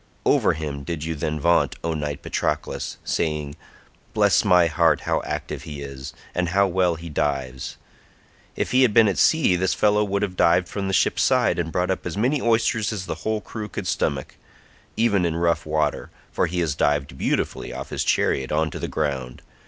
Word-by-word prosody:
Over -, -, +3 dB
him 75 Hz, -3 st, -5 dB
did 80 Hz, 0 st, -4 dB
you 80 Hz, +1 st, -2 dB
then 75 Hz, 0 st, -3 dB
vaunt, 85 Hz, +3 st, +2 dB
O 85 Hz, 0 st, -1 dB
knight 75 Hz, -2 st, -4 dB
Patroclus, -, -, -2 dB
saying, 75 Hz, -3 st, -2 dB, 0.6 s
"Bless -, -, +4 dB
my 90 Hz, -1 st, +5 dB
heart, 80 Hz, -1 st, +2 dB
how -, -, 0 dB
active -, -, -4 dB
he 75 Hz, -2 st, -7 dB
is, 70 Hz, 0 st, -7 dB, 0.2 s
and 90 Hz, -1 st, 0 dB
how 100 Hz, +3 st, +3 dB
well 90 Hz, -2 st, +1 dB
he 85 Hz, +1 st, -9 dB
dives. 70 Hz, -4 st, -2 dB, 0.8 s
If -, -, -2 dB
we 130 Hz, -, +5 dB
had 120 Hz, -5 st, +3 dB
been 115 Hz, -1 st, +7 dB
at 100 Hz, -, 0 dB
sea 160 Hz, -, +4 dB
this 95 Hz, +1 st, 0 dB
fellow 105 Hz, 0 st, +3 dB
would 100 Hz, 0 st, -1 dB
have 95 Hz, -3 st, -3 dB
dived 90 Hz, +1 st, +3 dB
from 95 Hz, +1 st, -4 dB
the 95 Hz, -, -2 dB
ship's -, -, +2 dB
side -, -, +2 dB
and 80 Hz, -1 st, -2 dB
brought 90 Hz, +3 st, 0 dB
up 95 Hz, -, -3 dB
as 85 Hz, -, -5 dB
many 130 Hz, +6 st, +1 dB
oysters 115 Hz, -2 st, +1 dB
as 100 Hz, -4 st, -4 dB
the -, -, -3 dB
whole 110 Hz, -1 st, -1 dB
crew 105 Hz, +2 st, -7 dB
could -, -, -5 dB
stomach, 70 Hz, -2 st, -2 dB, 0.6 s
even 105 Hz, -5 st, +2 dB
in 85 Hz, -2 st, 0 dB
rough 85 Hz, -1 st, 0 dB
water, 75 Hz, -2 st, -1 dB, 0.2 s
for -, -, +1 dB
he 90 Hz, +1 st, -2 dB
has 80 Hz, -4 st, 0 dB
dived 70 Hz, -2 st, 0 dB
beautifully -, -, -2 dB
off -, -, -7 dB
his -, -, -1 dB
chariot 65 Hz, -1 st, +1 dB
on 80 Hz, 0 st, +1 dB
to -, -, -6 dB
the -, -, -3 dB
ground. 70 Hz, -5 st, -3 dB
85 Hz, 200 wpm, -23 LUFS, 75-95 Hz, 0.8 s, been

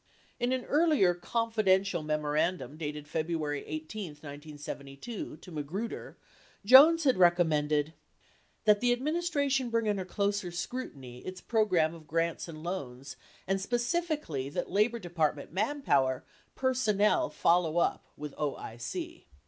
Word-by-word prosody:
In 245 Hz, +1 st, +1 dB
an 255 Hz, -1 st, -1 dB
earlier 295 Hz, -, +4 dB
"Confidential" 200 Hz, -2 st, +1 dB
memorandum 150 Hz, -1 st, -1 dB
dated 150 Hz, -1 st, -5 dB
February 155 Hz, -2 st, -2 dB
18, 155 Hz, +3 st, -5 dB
1972, 145 Hz, -, -8 dB
to 180 Hz, +3 st, -13 dB
Magruder, 165 Hz, +9 st, -5 dB, 0.5 s
82 -, -, -17 dB
Jones 310 Hz, +7 st, +9 dB
had 265 Hz, -6 st, +3 dB
recommended: 155 Hz, -4 st, +3 dB, 0.7 s
That 210 Hz, -1 st, +6 dB
the 245 Hz, 0 st, +4 dB
Administration 285 Hz, -2 st, 0 dB
bring 230 Hz, -1 st, 0 dB
under 200 Hz, -2 st, 0 dB
closer 200 Hz, 0 st, -1 dB
scrutiny 145 Hz, -, -6 dB
its 185 Hz, +7 st, -7 dB
program 185 Hz, -9 st, +2 dB
of 160 Hz, -2 st, -13 dB
grants 165 Hz, +1 st, -1 dB
and 155 Hz, -2 st, -9 dB
loans 135 Hz, -7 st, -5 dB, 0.3 s
and 195 Hz, 0 st, 0 dB
specifically 240 Hz, -, -1 dB
that 175 Hz, +5 st, -4 dB
Labor 215 Hz, +5 st, +2 dB
Department 160 Hz, -7 st, -2 dB
manpower 185 Hz, -, +1 dB, 0.3 s
personnel 255 Hz, -, +2 dB
follow 170 Hz, -1 st, +2 dB
up 175 Hz, -, +1 dB
with 150 Hz, -1 st, -6 dB
OIC. 120 Hz, -5 st, -5 dB
180 Hz, 120 wpm, -30 LUFS, 150-230 Hz, 0.7 s, Jones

